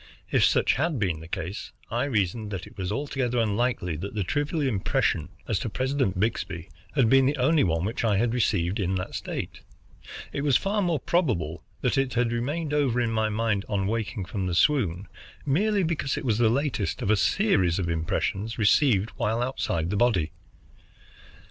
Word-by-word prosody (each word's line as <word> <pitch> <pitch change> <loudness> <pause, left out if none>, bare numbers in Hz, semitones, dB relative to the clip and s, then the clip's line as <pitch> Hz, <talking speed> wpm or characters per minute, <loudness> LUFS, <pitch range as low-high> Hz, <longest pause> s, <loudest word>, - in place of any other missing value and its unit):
If - - +3
such - - +4
had 155 +1 0
been 90 -8 0
the 80 - -10
case, 90 +6 -5 0.2
I 120 +3 0
reasoned 105 -4 -1
that 95 -3 -5
it - - -15
was 95 0 -3
altogether 130 -1 -1
unlikely 110 -5 0
that 100 +6 -6
the 105 - 0
trivial 145 - -1
impression 95 - 0 0.2
as 105 -4 0
to - - -3
President 130 -5 -1
Byxbee 95 -5 -2 0.3
had 130 -5 +4
been 135 +2 +5
the 145 +2 0
only 150 +5 +3
one 85 -1 +1
which 110 +3 -2
I 105 -4 +2
had 115 +2 +1
received 100 -5 +1
in 95 -1 0
that 90 - -4
state. - - -5 0.7
It 140 - -2
was 140 -3 +4
far 205 +2 0
more 170 -5 +1
probable 110 - 0 0.2
that - - +1
it 135 -2 -1
had 120 -1 +2
remained 145 +6 -2
over 135 -5 +2
in 120 -2 +1
my 110 -1 +1
mind, 110 -2 0
on 100 -2 0
waking 105 -2 -2
from 95 +1 -3
the 90 - -1
swoon, 100 - +2 0.4
merely 200 +8 +2
because 160 -5 -1
it - - -4
was 115 -3 +1
the 115 -2 +4
latest 135 -4 -1
of 100 - +2
a - - +5
series 95 - +2
of 95 -3 -1
impressions 95 +6 -1
received 110 -1 +3
while 110 +2 0
outside 85 -9 -1
the 105 - 0
body. 100 -9 +2
110 Hz, 185 wpm, -26 LUFS, 95-135 Hz, 0.7 s, been